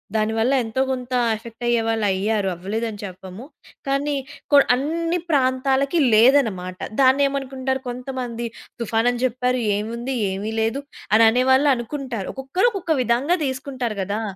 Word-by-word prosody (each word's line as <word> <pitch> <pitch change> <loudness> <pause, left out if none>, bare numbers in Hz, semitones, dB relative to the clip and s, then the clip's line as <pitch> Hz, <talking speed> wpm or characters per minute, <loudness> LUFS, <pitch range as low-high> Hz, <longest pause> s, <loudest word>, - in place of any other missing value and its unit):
దానివల్ల 225 +4 +1
ఎంతో 225 +3 -2
కొంత 255 -1 -4 0.2
ఎఫెక్ట్ 230 +2 -11
అయ్యేవాళ్ళు 225 -2 +1
అయ్యారు 200 +1 0
అవ్వలేదని 210 +4 -4
చెప్పము. 190 +3 -9 0.4
కానీ 280 +2 0 0.4
కొ 285 - +7 0.2
అన్నీ 330 +6 -1
ప్రాంతాలకి 270 +2 +2
లేదనమాట. 215 -7 +3 0.2
దాన్నేమనుకుంటారు 265 -1 +1
కొంతమంది 245 -2 -5 0.3
"తుఫానని 235 +2 0
జెప్పారు. 250 0 0 0.2
ఏముంది? 235 +5 -4 0.2
ఏమి 200 +3 -4
లేదు." 225 +5 -1 0.3
అని 225 +1 +7
అనేవాళ్ళు 260 +4 +3
అనుకుంటారు. 240 -4 -5
ఒక్కొక్కరు 270 - +1
ఒక్కొక్క 365 -6 -1
విధంగా 255 +9 +1
తీసుకుంటారు 260 -4 -3
గదా! 200 +3 -2
250 Hz, 115 wpm, -22 LUFS, 225-270 Hz, 0.4 s, కొ